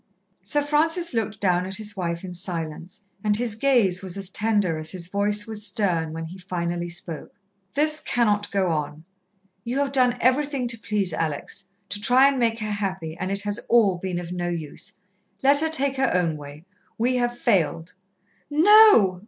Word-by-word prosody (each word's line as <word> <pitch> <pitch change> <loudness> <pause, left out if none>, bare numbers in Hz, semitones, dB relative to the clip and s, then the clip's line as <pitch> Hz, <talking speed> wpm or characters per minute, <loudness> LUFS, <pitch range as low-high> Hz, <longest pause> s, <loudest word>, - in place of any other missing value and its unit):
Sir 290 -1 0
Francis 325 +3 +1
looked 220 -3 -2
down 180 -2 +1
at 190 - -3
his 210 0 -4
wife 170 -2 -3
in 180 -1 -7
silence, 175 +1 -5 0.2
and 210 -1 +2
his 235 -1 -1
gaze 220 -7 +2
was 190 -1 -6
as 195 -1 -4
tender 205 -7 +1
as 155 0 -3
his 180 -1 -2
voice 205 +3 0
was 220 -2 -5
stern 180 -8 0
when 165 +1 -5
he 180 +4 -10
finally 175 -1 -3
spoke. 170 -2 -5 0.4
"This 305 +1 +2
cannot 210 -8 0
go 190 -3 0
on. 155 0 -4 0.6
You 245 +3 -3
have 280 -1 0
done 250 -2 +2
everything 270 +1 +1
to 230 -2 0
please 205 -5 0
Alex 155 -3 -3 0.2
to 205 +2 -2
try 250 +5 +5
and 275 -2 -2
make 230 -2 +1
her 215 0 -3
happy, 190 -6 -3
and 185 - -2
it 200 +1 -2
has 205 0 -2
all 205 -7 +4
been 185 -1 -3
of 175 -1 -6
no 175 -1 -2
use. 160 -4 -6 0.5
Let 280 +1 +5
her 320 +1 +1
take 280 -3 +1
her 265 -2 +2
own 170 -3 +1
way! 145 +2 -11 0.3
We 250 +3 +1
have 240 0 -1
failed." 170 - 0 0.6
"No!" 315 - +6
205 Hz, 185 wpm, -24 LUFS, 175-245 Hz, 0.6 s, No